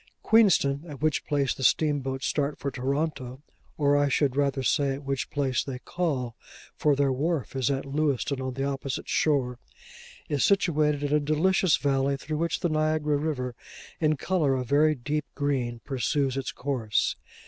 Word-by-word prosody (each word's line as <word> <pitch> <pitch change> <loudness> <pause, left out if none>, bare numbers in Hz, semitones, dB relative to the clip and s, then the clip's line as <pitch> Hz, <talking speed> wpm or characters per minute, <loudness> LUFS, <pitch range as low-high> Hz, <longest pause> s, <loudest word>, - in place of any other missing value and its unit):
Queenston, 165 -10 +4
at 145 -4 -8
which 155 -1 0
place 140 -2 +1
the - - -10
steamboats 135 -2 +1
start 145 0 -1
for 140 - -3
Toronto 135 0 -3 0.3
(or 145 -1 +3
I 145 0 +3
should 140 -1 +1
rather 140 -1 +1
say 135 +1 +1
at 140 - -9
which 135 -1 -2
place 135 -4 0
they 135 -2 -5
call, 130 -6 -2 0.4
for 150 -2 +2
their 140 -1 +2
wharf 145 -1 -2
is 130 -3 +1
at 135 -1 -1
Lewiston, 140 -1 -1
on 130 -1 -4
the 135 - -2
opposite 135 -1 -3
shore), 130 -5 +1 0.7
is 145 -3 0
situated 155 -7 +2
in 145 0 0
a 150 - +4
delicious 160 +4 +2
valley, 140 0 +1
through 155 +3 -4
which 170 0 -1
the 175 - +1
Niagara 155 -1 +1
river, 140 -4 -2 0.5
in 155 -2 +2
colour 155 -5 +1
a 130 - -1
very 150 +5 +3
deep 150 +4 -2
green, 130 -5 -1
pursues 135 0 0
its 135 -2 -3
course. 125 -6 -1
140 Hz, 170 wpm, -27 LUFS, 135-150 Hz, 0.7 s, Queenston